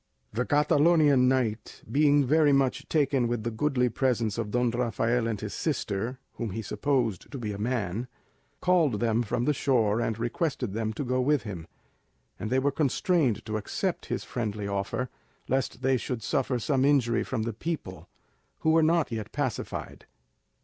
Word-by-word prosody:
The 125 +2 -1
Catalonian 145 -2 +4
knight 120 -5 -1
being 145 +3 +4
very 150 +2 +4
much 135 -2 +1
taken 135 -5 +2
with 120 -2 -2
the 120 - -2
goodly 125 +2 +1
presence 115 -3 0
of 110 -3 -2
Don 120 +2 +1
Rafael 120 0 0
and 110 -3 -2
his 105 0 -5
sister 120 -5 -2 0.2
(whom 115 - -3
he 110 +4 -4
supposed 125 -5 -1
to 140 - -5
be 110 -4 -3
a 100 - -6
man), 110 -1 -2 0.5
called 165 - +3
them 115 0 +2
from 120 +1 -1
the 150 - +3
shore, 120 -6 +2
and 115 -2 -1
requested 120 - -2
them 110 0 -1
to 145 - -3
go 130 0 0
with 145 +2 +2
him, 90 -7 -7 0.7
and 110 - -3
they 130 - +2
were 140 +2 +2
constrained 145 - +1
to 110 0 -2
accept 105 - -3
his - - -2
friendly 105 -3 -3
offer, 100 +5 -2 0.4
lest 130 -1 -1
they 130 0 +3
should 120 -2 -4
suffer 125 +3 0
some 130 +3 +1
injury 135 -5 +3
from 115 -4 -2
the 115 0 -3
people, 115 - -5 0.5
who 160 - +3
were 165 0 +5
not 160 -3 +2
yet 110 -2 -4
pacified. 135 -5 -4
125 Hz, 170 wpm, -28 LUFS, 110-140 Hz, 0.7 s, were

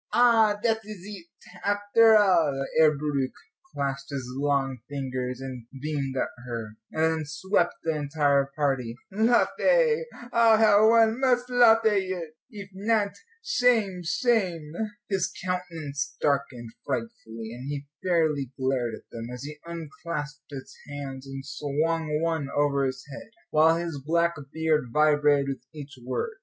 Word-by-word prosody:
"Ah, 225 -4 +5
dat 225 -2 +2
is 205 -3 -10
eet, 200 -5 -9 0.4
after 205 +2 +5
all." 165 -9 +3
Herr 155 -2 +5
Bauricke 140 -3 -2 0.4
clasped 140 0 -3
his 135 -3 -4
long 135 -2 0
fingers 130 -3 -4
and 130 -3 -7
beamed 140 -2 -3
at - - 0 0.2
her, 115 -3 -4 0.2
and 160 0 +1
then - - -3
swept 175 +5 0
the 160 -1 0
entire 145 -2 +1
party. 135 -6 -1 0.2
"Lofe, 455 - +3 0.3
ah, 230 -1 +6
how 215 0 +6
one 225 +1 +4
must 250 -2 +2
lofe 230 -2 +6
eet! 185 -6 0 0.2
Eef 200 -3 -9
not, 205 +1 +1 0.3
shame, 230 - +2
shame!" 180 - 0 0.3
His 190 -3 0
countenance 165 -6 -3
darkened 135 -5 -1
frightfully, 115 - -5
and 125 +3 -7
he 145 -1 -4 0.2
fairly 155 -7 +1
glared 130 -3 -1
at - - -16
them, 115 0 -7
as 125 +1 -7
he 150 +1 -8
unclasped 155 -2 -6
his 135 -1 -9
hands 140 -2 -7
and 135 0 -7
swung 150 +2 -1
one 160 -4 -1
over 140 -1 +2
his 130 - -6
head, - - -9 0.2
while 160 +1 +5
his 165 -5 -4
black 170 +3 +2 0.2
beard 160 -3 +1
vibrated 145 -1 +3
with - - -36
each 145 -1 -9
word. 265 - -3
155 Hz, 140 wpm, -26 LUFS, 140-205 Hz, 0.4 s, ah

